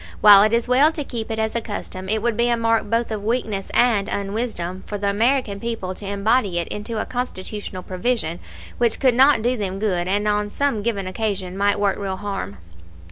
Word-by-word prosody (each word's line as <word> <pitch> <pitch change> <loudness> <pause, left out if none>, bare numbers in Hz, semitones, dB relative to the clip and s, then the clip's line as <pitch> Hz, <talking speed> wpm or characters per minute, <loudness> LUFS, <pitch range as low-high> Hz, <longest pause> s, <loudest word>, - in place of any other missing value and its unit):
While 205 -2 +9
it 215 +1 +4
is 235 +1 +1
well 270 +5 +5
to 300 - -3
keep 235 -4 -5
it 220 - -3
as 220 0 -1
a 235 - 0
custom, 190 -3 -6
it 220 0 0
would 235 -2 +1
be 235 +2 +2
a 235 - +2
mark 225 -2 +1
both 230 +1 0
of 210 -2 -3
weakness 215 -3 -2
and 230 -5 +2
unwisdom 195 -3 -3
for 205 - -4
the 200 0 0
American 225 -1 +1
people 225 -5 -4
to 200 +1 -9
embody 200 -1 +1
it 170 - -1
into 215 +2 -4
a - - -2
Constitutional 210 -6 -5
provision 185 -3 -2 0.4
which 235 -2 +2
could 260 -3 +4
not 265 -1 +5
do 245 +2 +2
them 195 -4 -3
good 185 -4 -1
and 205 +2 0
on 210 0 +1
some 275 -2 0
given 205 -3 -2
occasion 190 -2 -3
might 200 +1 +1
work 200 -1 +1
real 190 -2 -3
harm. 195 - -5
210 Hz, 210 wpm, -22 LUFS, 195-235 Hz, 0.4 s, While